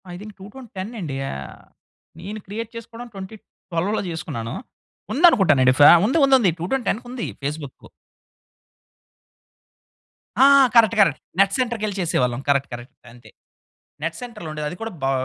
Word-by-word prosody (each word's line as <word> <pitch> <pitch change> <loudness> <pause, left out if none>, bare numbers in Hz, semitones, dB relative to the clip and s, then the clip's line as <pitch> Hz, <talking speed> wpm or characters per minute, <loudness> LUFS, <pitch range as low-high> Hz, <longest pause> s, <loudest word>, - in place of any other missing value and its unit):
I - - -7
think 210 +1 -10
2010 205 -1 -9
అండి. 150 -8 -5
ఆహ్, 70 -2 -9 0.6
నేను 205 +5 -7
క్రియేట్ 220 +3 -6
చేసుకోవడం 230 +1 -9
2012లో 195 -1 -5
జేసుకున్నాను. 140 -9 -5 0.6
ఉందనుకుంటానండి 190 - +5
ఫ్యా 145 - +9
ఉంది. 260 +9 +1
ఉంది. 270 -1 +5
ఉంది. 195 -7 +3
Two 170 - -3
town 265 -2 0
టెన్‌కుంది 245 +1 -4
Facebook. 145 -1 -6 2.5
ఆ! 270 - +7 0.3
కరెక్ట్. 230 -1 +5
కరెక్ట్. 165 -8 +2 0.2
నెట్ 195 0 +3
సెంటర్‌కెళ్లి 225 -5 -2
చేసేవాళ్ళం 125 -7 0
కరెక్ట్ 140 -1 +1
కరెక్ట్ 120 +1 -9 0.2
అంతే. 120 0 -17 0.7
నెట్ 165 +1 -3
సెంటర్‌లో 230 -9 -8
ఉండేది 150 -1 -5
అది 175 - -8
కూడా 225 0 -5
బా 135 - +1
195 Hz, 135 wpm, -22 LUFS, 145-230 Hz, 2.5 s, ఫ్యా